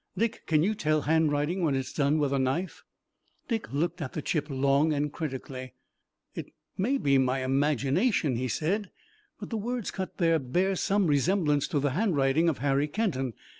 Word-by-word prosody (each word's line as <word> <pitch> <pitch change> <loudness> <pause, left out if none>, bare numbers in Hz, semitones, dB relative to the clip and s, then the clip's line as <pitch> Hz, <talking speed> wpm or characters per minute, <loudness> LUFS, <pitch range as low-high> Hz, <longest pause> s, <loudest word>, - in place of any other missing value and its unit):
Dick, 230 0 -1
can 155 -1 +3
you 210 +5 +2
tell 155 -7 0
handwriting 155 +3 +1
when 155 -5 +1
it's 135 -1 -3
done 145 +1 +2
with 145 -2 0
a 135 - +1
knife?" 145 +8 -2 0.6
Dick 225 -4 -3
looked 165 +5 -1
at 135 - -5
the 155 - -3
chip 155 -2 -1
long 140 +3 +2
and 145 0 -1
critically. 130 -4 -6 0.6
"It - - -7 0.2
may 250 +9 +1
be 140 - +1
imagination," 135 - +1
he 130 +2 -1
said, 185 - -1 0.5
"but - - -8
the 225 - -1
words 235 +1 -3
cut 190 -1 -5
there 165 -2 +3
bear 180 +9 0
some 200 +2 +1
resemblance 150 -1 +2
to 155 -6 0
the 140 0 0
handwriting 160 - +2
of 155 - -2
Harry 140 +2 +1
Kenton. 145 - -1
150 Hz, 170 wpm, -28 LUFS, 135-185 Hz, 0.6 s, can